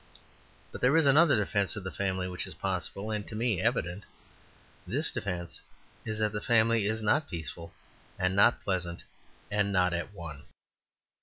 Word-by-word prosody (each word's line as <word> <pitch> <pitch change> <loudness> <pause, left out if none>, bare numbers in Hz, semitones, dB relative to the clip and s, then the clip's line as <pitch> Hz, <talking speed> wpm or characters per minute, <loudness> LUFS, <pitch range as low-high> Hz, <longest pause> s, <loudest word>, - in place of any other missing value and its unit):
But - - -8
there 135 +5 +4
is 165 - +5
another 145 +2 +6
defence 100 -2 0
of 105 - -6
the 95 - -4
family 95 -2 -2
which 90 0 -2
is - - -9
possible, 95 +3 -3
and 105 -1 -3
to 110 - -7
me 110 -4 0
evident; 90 +4 0 0.8
this 140 - 0
defence 90 -4 -4 0.4
is 110 -1 -3
that 110 -1 +1
the 105 0 -3
family 115 -2 +3
is 110 +1 -1
not 145 +8 +2
peaceful 85 0 -6 0.5
and 95 +1 0
not 100 +4 +4
pleasant 90 -3 -2 0.5
and 100 -1 +1
not 90 -2 +2
at 85 +3 -3
one. 85 -7 -9
100 Hz, 165 wpm, -30 LUFS, 90-110 Hz, 0.8 s, another